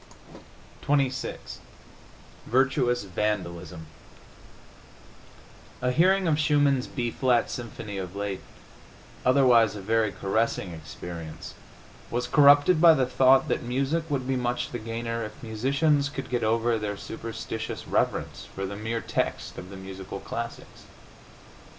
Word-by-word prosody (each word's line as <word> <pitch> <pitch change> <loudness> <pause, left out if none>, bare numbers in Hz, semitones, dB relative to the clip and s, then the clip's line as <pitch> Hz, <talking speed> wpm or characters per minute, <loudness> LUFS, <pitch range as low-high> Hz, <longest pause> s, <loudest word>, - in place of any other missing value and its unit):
XXVII 135 -2 0 1.1
VIRTUOUS 125 -2 +2
VANDALISM 90 -4 -3 2.0
A 125 - +2
hearing 185 +6 +3
of 155 -2 +2
Schumann's 145 -3 +3
B 120 -3 -3
flat 125 -2 +1
symphony 110 -4 -6
of 95 0 -6
late, 100 -1 -3 0.8
otherwise 125 -5 +5
a - - -6
very 110 +1 +1
caressing 100 -2 -1
experience, 80 +1 -8 0.6
was 120 +1 -1
corrupted 145 +5 +6
by 165 -2 +8
the 130 -3 +2
thought 130 +1 +4
that - - 0
music 140 +7 -1
would 135 -3 -1
be 135 - +1
much 125 +1 -1
the 120 - -4
gainer 115 +1 -3
if 105 +2 -9
musicians 140 +6 +1
could 135 -4 -7
get 120 -2 0
over 115 +1 +2
their 105 -1 -3
superstitious 115 +1 -6
reverence - - -1
for 95 - -3
the 100 +1 -5
mere 115 +2 -3
text - - -3
of 90 - -9
the 95 - -9
musical 95 0 -7
classics. - - -7
120 Hz, 125 wpm, -27 LUFS, 105-135 Hz, 2.0 s, by